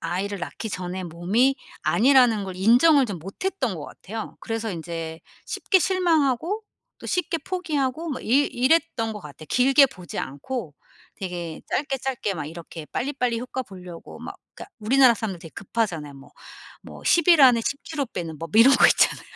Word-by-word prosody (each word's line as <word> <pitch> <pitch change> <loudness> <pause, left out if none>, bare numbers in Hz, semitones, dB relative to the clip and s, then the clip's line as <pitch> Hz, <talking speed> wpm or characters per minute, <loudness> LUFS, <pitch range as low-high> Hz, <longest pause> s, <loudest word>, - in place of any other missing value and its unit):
아이를 190 +4 -3
낳기 220 - -5
전의 185 0 -4
몸이 200 +11 +1 0.3
아니라는 245 -4 +4
걸 190 -1 -7
인정을 250 - +5
좀 195 -5 -5
못 195 - -9
했던 270 - -1
것 150 - -7
같아요. 220 +2 -8
그래서 225 0 -3
인제 165 -1 -6 0.3
쉽게 380 - +2
실망하고 340 - +1 0.4
또 - - -10
쉽게 345 -2 -1
포기하고 315 -3 -2
막 260 - -5
이 - - -10 0.2
이랬던 260 -3 +1
것 210 - -8
같아. 150 -2 -11
길게 270 +3 +5
보지 180 -9 -9
않고 155 - -5 0.4
되게 175 -4 -5
짧게 275 -1 -1
짧게 250 -6 -2
막 155 -4 -5
이렇게 165 0 -9
빨리빨리 250 -3 -2
효과 255 +1 -4
보려고 180 -5 -11
막 - - -7 0.2
그니까 - - -11
우리나라 250 +2 +5
사람들 205 -4 -4
되게 165 - -12
급하잖아요. 180 -9 -3
뭐, 135 0 -15 0.5
뭐 - - -12
10 340 0 +3
일 335 -5 +7
안에 245 -3 +7
10 280 - -2
키로 290 -4 -3
빼는 165 -7 -6
법 165 +5 -4
이런 260 +4 +8
거 - - +6
있잖아요. - - +3
230 Hz, 345 characters per minute, -24 LUFS, 180-275 Hz, 0.5 s, 이런